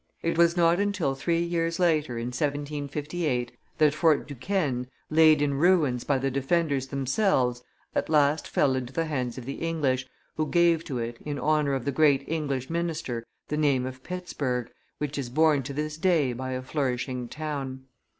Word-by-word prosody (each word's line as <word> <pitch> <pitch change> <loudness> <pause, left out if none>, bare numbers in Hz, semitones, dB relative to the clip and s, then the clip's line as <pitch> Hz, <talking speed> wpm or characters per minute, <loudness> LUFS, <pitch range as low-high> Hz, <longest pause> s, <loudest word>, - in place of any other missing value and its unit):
It 165 - 0
was 170 +1 +4
not 170 +1 +4
until 200 -9 0
three 165 +5 0
years 170 -1 -1
later, 155 -8 +1
in 115 +1 -3
1758, 145 0 -2 0.3
that 150 -2 +4
Fort 155 -1 +2
Duquesne, 140 -3 -1 0.2
laid 155 -1 +6
in 140 -1 +1
ruins 150 -5 +3
by 140 - +1
the 135 +1 -1
defenders 140 0 0
themselves, 130 - +1 0.3
at - - -1
last 150 0 +3
fell 140 -2 +2
into 130 0 -4
the 165 +2 0
hands 130 -6 -2
of 125 - -7
the 135 - -5
English, 140 -6 0 0.3
who 155 0 0
gave 170 -1 +3
to 130 - -3
it, 115 0 -4
in 145 -1 -3
honor 150 0 +1
of 130 - -4
the 140 - +1
great 140 -1 +4
English 140 -5 -2
minister, 165 -8 -2 0.3
the 150 - -1
name 140 -4 +2
of 130 0 -7
Pittsburg, 135 -9 -3 0.3
which 150 -1 -3
is 130 -3 -4
borne 155 +1 +3
to 135 +2 -6
this 150 +2 -3
day 160 -7 +2
by 130 +2 -4
a 130 0 -4
flourishing 130 -2 -2
town. 140 -3 -5
145 Hz, 175 wpm, -27 LUFS, 130-160 Hz, 0.3 s, laid